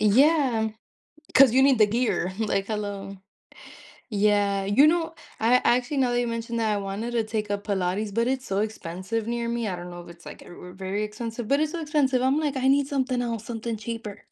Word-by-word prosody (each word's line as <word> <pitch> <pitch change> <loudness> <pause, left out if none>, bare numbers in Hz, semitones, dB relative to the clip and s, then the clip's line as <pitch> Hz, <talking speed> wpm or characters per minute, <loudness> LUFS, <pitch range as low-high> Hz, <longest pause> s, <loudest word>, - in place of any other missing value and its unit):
Yeah, 250 0 +4 0.7
'cause 260 -3 +7
you 265 - +5
need 270 -1 +5
the 215 - +6
gear, 215 -4 0
like, 200 -3 0
"Hello." 200 -2 -4 0.9
Yeah, 205 -2 +2
you 210 +10 +5
know, 330 0 +1 0.2
I 235 +3 +4
actually- 250 +4 +2
now 250 -2 +2
that 240 - +2
you 245 - -1
mentioned 230 0 -3
that- 220 -1 +1
I 205 - 0
wanted 200 +4 -4
to 230 -2 +1
take 215 -1 -3
a 205 - 0
Pilates, 200 0 -2
but 230 +3 +1
it's 260 0 -1
so 195 +1 0
expensive 210 +1 -4
near 235 0 -2
me. 235 -2 -2
I 180 - -3
don't 175 0 -8
know 175 0 -8
if 175 - -12
it's 170 0 -14
like, - - -10
uh, - - -14
v 180 +1 -11
very 195 +3 -3
expensive, 225 +1 -5
but 280 +4 +2
it's 310 0 0
so 340 - -4
expensive. 275 -4 +1
I'm 265 +3 +2
like, 290 -3 -1
"I 265 0 +1
need 280 0 +3
something 260 -3 0
else, 230 -2 -3
something 230 -1 -4
cheaper." 215 -2 -7
225 Hz, 220 wpm, -25 LUFS, 205-255 Hz, 0.9 s, cause